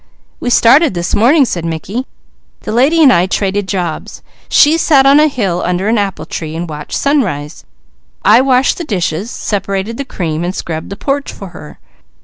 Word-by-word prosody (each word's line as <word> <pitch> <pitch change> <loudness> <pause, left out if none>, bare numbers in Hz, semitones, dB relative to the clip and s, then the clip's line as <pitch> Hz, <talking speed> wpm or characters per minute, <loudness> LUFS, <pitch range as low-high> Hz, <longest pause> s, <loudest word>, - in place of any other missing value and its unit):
"We 245 - -3
started 245 - +4
this 175 0 -3
morning," 270 +6 +4
said 175 -8 -4
Mickey. 170 - -4 0.5
"The - - -5
lady 280 +8 +3
and 265 -4 +6
I 175 +2 +2
traded 195 0 -1
jobs; 180 -5 -4 0.3
she 300 +2 +5
sat 295 -4 +3
on 280 +2 +6
a 305 - +5
hill 200 - -2
under 180 +3 -1
an 225 0 +2
apple 195 -2 -3
tree 160 -1 -6
and 170 +1 -4
watched 150 -1 -6
sunrise. 195 - -1 0.6
I - - +6
washed 260 +2 +2
the - - -3
dishes, 190 - -2
sep'rated 200 0 -3
the 280 - -3
cream, 165 -8 -4
and 180 +2 -3
scrubbed 160 -1 -5
the 200 - -6
porch 280 +3 -2
for 195 - -10
her. 155 -3 -12
200 Hz, 180 wpm, -14 LUFS, 175-270 Hz, 0.6 s, and